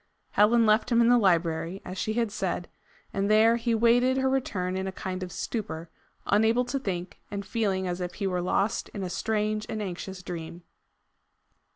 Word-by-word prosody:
Helen 225 Hz, +3 st, +4 dB
left 220 Hz, +3 st, +3 dB
him 235 Hz, -, +4 dB
in 235 Hz, 0 st, +5 dB
the 245 Hz, -, +6 dB
library, 170 Hz, -2 st, +1 dB
as 185 Hz, -, -6 dB
she 215 Hz, +3 st, -2 dB
had 230 Hz, -2 st, 0 dB
said, 180 Hz, -3 st, -2 dB, 0.5 s
and 195 Hz, +1 st, 0 dB
there 220 Hz, +2 st, +5 dB
he 235 Hz, 0 st, 0 dB
waited 245 Hz, +3 st, +4 dB
her 265 Hz, 0 st, +2 dB
return 185 Hz, -9 st, -1 dB
in 190 Hz, 0 st, -2 dB
a -, -, -2 dB
kind 185 Hz, -1 st, -5 dB
of 180 Hz, -1 st, -5 dB
stupor, 170 Hz, -6 st, -4 dB, 0.3 s
unable 220 Hz, +4 st, +3 dB
to 275 Hz, +3 st, -2 dB
think, 180 Hz, -6 st, -4 dB
and 200 Hz, -1 st, -5 dB
feeling 195 Hz, -5 st, 0 dB
as 180 Hz, 0 st, -3 dB
if 180 Hz, -1 st, -4 dB
he 200 Hz, -, -3 dB
were 180 Hz, -2 st, 0 dB
lost 195 Hz, +4 st, 0 dB
in 200 Hz, -, -3 dB
a 180 Hz, -, -4 dB
strange 215 Hz, +2 st, -1 dB
and 220 Hz, -, -3 dB
anxious 190 Hz, -1 st, -5 dB
dream. 170 Hz, -1 st, -7 dB
200 Hz, 190 wpm, -27 LUFS, 180-225 Hz, 0.5 s, the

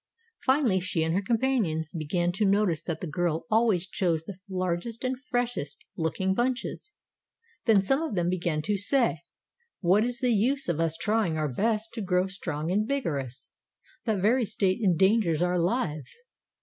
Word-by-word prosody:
Finally 260 Hz, -8 st, +3 dB
she 175 Hz, -2 st, -1 dB
and 160 Hz, 0 st, 0 dB
her 190 Hz, -, +1 dB
companions 215 Hz, -, 0 dB
began 175 Hz, +1 st, -1 dB
to 195 Hz, +4 st, -1 dB
notice 200 Hz, -5 st, +2 dB
that 165 Hz, -, -4 dB
the -, -, -3 dB
girl 165 Hz, 0 st, -1 dB
always 215 Hz, -5 st, +3 dB
chose 175 Hz, -4 st, -1 dB
the 185 Hz, +2 st, -9 dB
largest 185 Hz, +5 st, -2 dB
and 255 Hz, 0 st, -1 dB
freshest 245 Hz, -, -3 dB
looking 190 Hz, +2 st, 0 dB
bunches. 250 Hz, -, -2 dB, 0.7 s
Then 215 Hz, -5 st, +5 dB
some 270 Hz, +9 st, +2 dB
of 320 Hz, -10 st, -3 dB
them 175 Hz, -2 st, +1 dB
began 170 Hz, -4 st, -1 dB
to 205 Hz, +2 st, 0 dB
say: 235 Hz, +5 st, +2 dB, 0.6 s
'What 195 Hz, +4 st, +3 dB
is 245 Hz, 0 st, -2 dB
the 250 Hz, -1 st, +2 dB
use 260 Hz, +7 st, +1 dB
of 170 Hz, -3 st, -1 dB
us 165 Hz, -1 st, 0 dB
trying 210 Hz, -6 st, 0 dB
our 150 Hz, -4 st, -1 dB
best 220 Hz, -, 0 dB
to 225 Hz, -, -4 dB
grow 180 Hz, -1 st, +1 dB
strong 170 Hz, -4 st, -4 dB
and 210 Hz, +3 st, +1 dB
vigorous? 140 Hz, -, -3 dB, 0.6 s
That 215 Hz, -5 st, 0 dB
very 240 Hz, +4 st, +4 dB
state 200 Hz, -1 st, +1 dB
endangers 190 Hz, -2 st, +3 dB
our 180 Hz, 0 st, +1 dB
lives. 170 Hz, -, -1 dB
190 Hz, 165 wpm, -27 LUFS, 170-230 Hz, 0.7 s, Then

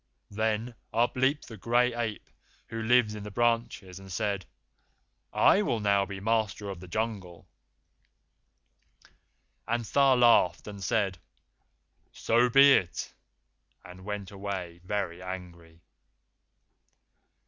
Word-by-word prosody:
Then 110 Hz, +3 st, -1 dB, 0.2 s
up 120 Hz, +1 st, +1 dB
leaped 135 Hz, +3 st, 0 dB
the 110 Hz, -, -10 dB
Gray 120 Hz, +4 st, +2 dB
Ape 115 Hz, -3 st, -4 dB, 0.4 s
who 115 Hz, -1 st, -5 dB
lives 115 Hz, -1 st, +3 dB
in 105 Hz, -, -7 dB
the 105 Hz, -, -7 dB
branches, 115 Hz, -4 st, -1 dB
and 95 Hz, -1 st, -12 dB
said, 100 Hz, -2 st, -2 dB, 0.8 s
'I 200 Hz, -, +4 dB
will 120 Hz, -, -1 dB
now 100 Hz, -1 st, +2 dB
be 100 Hz, -1 st, -7 dB
master 105 Hz, -1 st, -1 dB
of 95 Hz, -, -8 dB
the 90 Hz, -, -11 dB
Jungle.'" 95 Hz, -3 st, -4 dB, 2.2 s
At 120 Hz, +1 st, 0 dB
this 115 Hz, -, -10 dB
Tha 135 Hz, -2 st, +5 dB
laughed, 120 Hz, -7 st, +4 dB
and 100 Hz, -2 st, -8 dB
said, 100 Hz, -4 st, 0 dB, 0.9 s
"So 120 Hz, +2 st, +2 dB
be 140 Hz, +3 st, +7 dB
it," 90 Hz, -8 st, -1 dB, 0.7 s
and 90 Hz, +1 st, -12 dB
went 105 Hz, -1 st, -5 dB
away 95 Hz, -4 st, -6 dB
very 90 Hz, -3 st, -3 dB
angry. 85 Hz, -3 st, -9 dB
105 Hz, 120 wpm, -28 LUFS, 95-120 Hz, 2.2 s, be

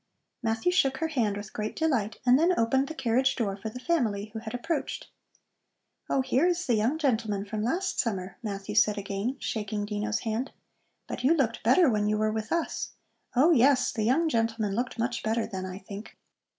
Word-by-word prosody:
Matthew 225 Hz, +8 st, +1 dB
shook 270 Hz, -7 st, +2 dB
her 320 Hz, +2 st, -1 dB
hand 225 Hz, -9 st, 0 dB
with 205 Hz, 0 st, -8 dB
great 215 Hz, 0 st, -3 dB
delight 255 Hz, -10 st, 0 dB
and 250 Hz, +2 st, +6 dB
then 350 Hz, +3 st, +3 dB
opened 265 Hz, +4 st, +2 dB
the 315 Hz, -, -6 dB
carriage 260 Hz, -1 st, +2 dB
door 205 Hz, -5 st, -1 dB
for 210 Hz, +3 st, -6 dB
the 250 Hz, -, -8 dB
family 220 Hz, -10 st, 0 dB
who 220 Hz, -, -4 dB
had 220 Hz, +1 st, -6 dB
approached. 315 Hz, +6 st, -3 dB, 1.0 s
"Oh, 270 Hz, -, +2 dB
here 265 Hz, +5 st, +2 dB
is 355 Hz, 0 st, 0 dB
the 245 Hz, -, +2 dB
young 230 Hz, +7 st, +2 dB
gentleman 220 Hz, -9 st, 0 dB
from 210 Hz, +1 st, -4 dB
last 350 Hz, -, -1 dB
summer," 195 Hz, -5 st, -2 dB
Matthew 205 Hz, -2 st, -5 dB
said 210 Hz, 0 st, +4 dB
again, 200 Hz, +5 st, -2 dB
shaking 210 Hz, -1 st, -3 dB
Dino's 210 Hz, +1 st, -2 dB
hand. 230 Hz, +4 st, -2 dB, 0.5 s
"But -, -, -6 dB
you 300 Hz, +6 st, +5 dB
looked 240 Hz, -7 st, 0 dB
better 260 Hz, +10 st, +5 dB
when 210 Hz, -4 st, +2 dB
you 215 Hz, -, +1 dB
were 215 Hz, 0 st, +1 dB
with 220 Hz, 0 st, -4 dB
us. 335 Hz, -1 st, -2 dB, 0.4 s
Oh, 290 Hz, +8 st, +5 dB
yes, 265 Hz, -2 st, +4 dB
the 220 Hz, -, -3 dB
young 260 Hz, +10 st, +3 dB
gentleman 225 Hz, -6 st, 0 dB
looked 245 Hz, +3 st, -2 dB
much 235 Hz, +1 st, -1 dB
better 225 Hz, +1 st, 0 dB
then, 190 Hz, -3 st, -5 dB
I 185 Hz, 0 st, -6 dB
think." 200 Hz, +2 st, -9 dB
230 Hz, 195 wpm, -28 LUFS, 210-265 Hz, 1.0 s, and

